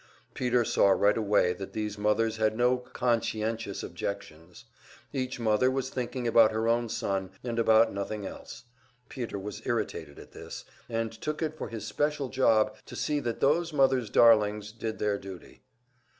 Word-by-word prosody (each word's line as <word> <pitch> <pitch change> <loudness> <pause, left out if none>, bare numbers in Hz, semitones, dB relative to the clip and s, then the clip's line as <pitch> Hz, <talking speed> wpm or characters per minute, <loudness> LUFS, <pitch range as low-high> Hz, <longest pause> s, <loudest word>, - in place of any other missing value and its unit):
Peter 125 -2 +1
saw 100 - +3
right 100 +1 +4
away 105 -5 +2
that 95 +2 -8
these 105 -1 -3
mothers 105 +2 +1
had 110 0 +1
no 125 +1 +3
"conscientious 115 -4 -2
objections." 90 -2 -7 0.5
Each 130 -2 -3
mother 110 +2 +3
was 130 0 -2
thinking 125 -1 -3
about 115 -1 +6
her 110 +1 -1
own 120 0 +1
son 95 -3 -2
and 120 -2 -2
about 110 0 +4
nothing 100 +1 -4
else. 115 - -9 0.5
Peter 120 -6 -5
was 105 +2 -6
irritated 85 - -3
at - - -13
this, - - -9 0.2
and 115 -1 -2
took 150 +8 -4
it 155 0 -2
for - - -6
his 110 -3 -6
special 145 +4 -1
job 110 -5 +3
to - - -9
see 150 -1 0
that 120 -4 -4
those 165 +4 +2
mother's 135 -5 +2
darlings 105 -2 +4
did 110 0 -5
their 105 -1 0
duty. 95 -2 -11
115 Hz, 165 wpm, -28 LUFS, 105-125 Hz, 0.5 s, about